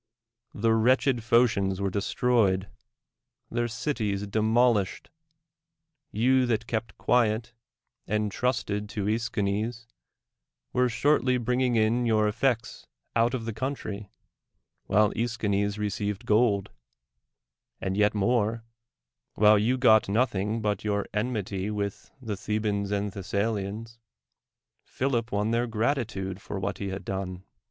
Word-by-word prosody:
The 110 +2 +2
wretched 130 +3 +3
Phoeians 110 -5 +2
were 100 -1 -1
destroyed, 100 -1 +1 0.8
their 120 0 0
cities 110 -4 -2
demolished; 110 0 +1 1.0
you 125 +4 +3
that 115 -1 0
kept 115 0 -3
quiet, 120 -1 +1 0.5
and 105 +1 0
trusted 105 -4 -1
to 105 -2 -3
^Eschines, 110 +1 -1 0.9
were 125 0 +3
shortly 125 +1 +2
bringing 125 +1 +1
in 115 +2 +2
your 110 -2 +3
efll'ec^s 115 +2 -1 0.3
out 120 +2 +3
of 115 -3 -4
the 115 - -3
country, 110 -5 -4 0.8
while 105 0 +4
^T^schines 105 -3 -1
received 105 +1 -3
gold: 105 -3 +2 1.1
and 95 0 -2
yet 105 +1 +3
more 115 +1 +1 0.4
— - - -59
while 105 0 +6
you 120 +5 +1
got 110 -5 +5
nothing 110 -1 0
but 105 -2 -1
your 100 -1 0
enmity 105 -3 -2
with 100 -1 -4
the 110 -5 -4
Thebans 105 -1 -2
ami 100 0 -1
Thessalians, 105 +3 -3 0.8
Philip 125 -3 -2
won 105 +2 0
their 120 +1 +1
gratitude 110 -5 -2
for 100 -1 -5
\\liat 100 +1 -3
he 100 - -3
had 95 0 -6
done. 95 -1 -4
110 Hz, 120 wpm, -27 LUFS, 100-120 Hz, 1.1 s, while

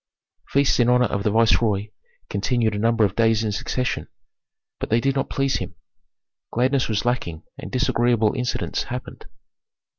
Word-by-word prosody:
Feasts 140 -1 +2
in 120 0 +4
honor 125 0 +4
of 100 -2 -2
the 105 - +1
viceroy 110 -2 +2 0.4
continued 120 -4 0
a 105 - -2
number 115 0 +3
of 95 -1 -2
days 115 -1 +3
in 110 - -1
succession, 115 -3 -2 0.7
but - - -4
they 115 - +3
did 135 +3 +1
not 135 - -2
please 135 -1 0
him. - - -6 0.8
Gladness 130 +2 +1
was 105 0 -1
lacking 90 -10 -2 0.2
and - - -8
disagreeable 120 -4 +2
incidents 125 0 -2
happened. 125 +1 -7
115 Hz, 155 wpm, -23 LUFS, 105-125 Hz, 0.8 s, in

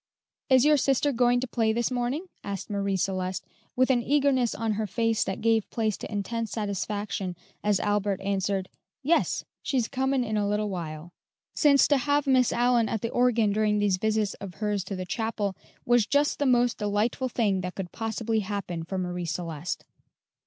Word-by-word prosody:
"Is 260 0 +6
your 300 0 +6
sister 275 +2 +2
going 245 -1 +3
to 260 - -2
play 225 -2 +1
this 235 +2 0
morning?" 250 +7 -1 0.2
asked 200 0 -5
Marie 200 -1 0
Celeste, 185 0 -2 0.3
with 255 +1 +3
an 245 -2 +3
eagerness 270 -2 +2
on 225 -1 -1
her 215 0 -1
face 225 +2 +1
that 190 - -4
gave 225 -1 +2
place 220 -3 0
to - - -8
intense 220 +2 -2
satisfaction 205 -2 -3 0.3
as 205 -2 +2
Albert 205 -2 0
answered, 195 -1 -1 0.4
"Yes; 330 +5 +2 0.2
she's 255 -6 0
comin' 265 0 0
in 215 -2 -2
a 205 -1 +1
little 210 0 0
while;" 165 -2 -6 0.4
since 285 -3 +5
to 290 - +4
have 290 +2 +1
Miss 260 -3 +4
Allyn 240 -2 +2
at 220 - -2
the 230 - -2
organ 235 -4 +3
during 210 0 +2
these 205 -2 +2
visits 215 0 0
of 195 -3 -7
hers 210 -3 -1
to 195 - -4
the 185 0 -4
chapel 205 0 -2 0.3
was 240 -3 +3
just 285 +3 +2
the 285 - +2
most 245 -1 +3
delightful 210 +5 0
thing 205 -6 +1
that 180 0 -5
could 185 -3 -5
possibly 225 0 -1
happen 195 -5 -4
for 190 +3 -4
Marie 180 -1 -3
Celeste. 165 -1 -4
215 Hz, 180 wpm, -27 LUFS, 195-245 Hz, 0.4 s, Is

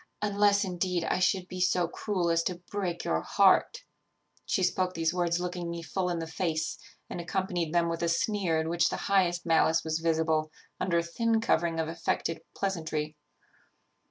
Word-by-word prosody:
unless, 205 0 +3
indeed, 180 -1 -1
I 180 - 0
should 185 0 +1
be 185 0 -6
so 180 -1 +2
cruel 175 -1 -1
as 165 0 +3
to 180 - -1
break 185 -4 -2
your 80 0 0
heart' 200 - +3 0.6
She 190 - +1
spoke 185 0 0
these 165 0 +1
words 175 -1 +1
looking 180 -1 -3
me 170 0 -5
full 180 +4 -2
in 175 - -1
the 165 - -3
face, 160 -1 -2 0.3
and 175 - -5
accompanied 175 -2 -2
them 170 0 +2
with 165 0 -2
a 170 - +1
sneer 170 -1 +1
in 160 - -1
which 170 +1 +2
the - - -3
highest 180 -3 +2
malice 165 0 +3
was 160 0 -1
visible, 160 -1 +1 0.3
under 185 -2 +1
a 170 - +2
thin 225 +7 +1
covering 170 -7 +1
of 160 - 0
affected 165 0 -2
pleasantry. 160 -5 -2
170 Hz, 180 wpm, -29 LUFS, 165-185 Hz, 0.6 s, unless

